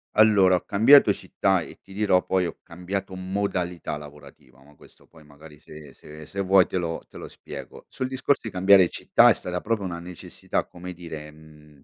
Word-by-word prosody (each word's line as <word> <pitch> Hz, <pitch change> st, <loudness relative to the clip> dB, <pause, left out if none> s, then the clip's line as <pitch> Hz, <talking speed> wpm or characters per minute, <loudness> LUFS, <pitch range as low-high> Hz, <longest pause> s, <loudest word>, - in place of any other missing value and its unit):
Allora, 105 Hz, -4 st, +5 dB
ho 90 Hz, -, -1 dB
cambiato 115 Hz, +8 st, +6 dB
città, 95 Hz, -2 st, -1 dB
e -, -, -11 dB
ti 95 Hz, -, -15 dB
dirò, 100 Hz, -3 st, +1 dB
poi 95 Hz, -2 st, 0 dB
ho -, -, -8 dB
cambiato 95 Hz, +3 st, -6 dB
modalità 95 Hz, -3 st, -3 dB
lavorativa, 70 Hz, -3 st, -15 dB
ma 75 Hz, +1 st, -20 dB
questo -, -, -21 dB
poi 80 Hz, -2 st, -20 dB
magari 75 Hz, +1 st, -16 dB
se 75 Hz, -3 st, -14 dB
se 75 Hz, +1 st, -13 dB
se 100 Hz, -, -5 dB
vuoi 95 Hz, -2 st, +4 dB
te 95 Hz, -, -4 dB
lo 85 Hz, -2 st, -4 dB
te -, -, -14 dB
lo -, -, -8 dB
spiego. -, -, -11 dB
Sul 130 Hz, -, -4 dB
discorso 130 Hz, +2 st, 0 dB
di -, -, -3 dB
cambiare 95 Hz, -1 st, +5 dB
città -, -, +4 dB
è -, -, +6 dB
stata 90 Hz, -1 st, -5 dB
proprio 110 Hz, -2 st, -2 dB
una 85 Hz, -2 st, -5 dB
necessità, 90 Hz, 0 st, -5 dB
come 90 Hz, +1 st, -10 dB
dire, 80 Hz, -3 st, -9 dB
mhmm 75 Hz, -2 st, -19 dB
90 Hz, 195 wpm, -24 LUFS, 75-95 Hz, -, cambiato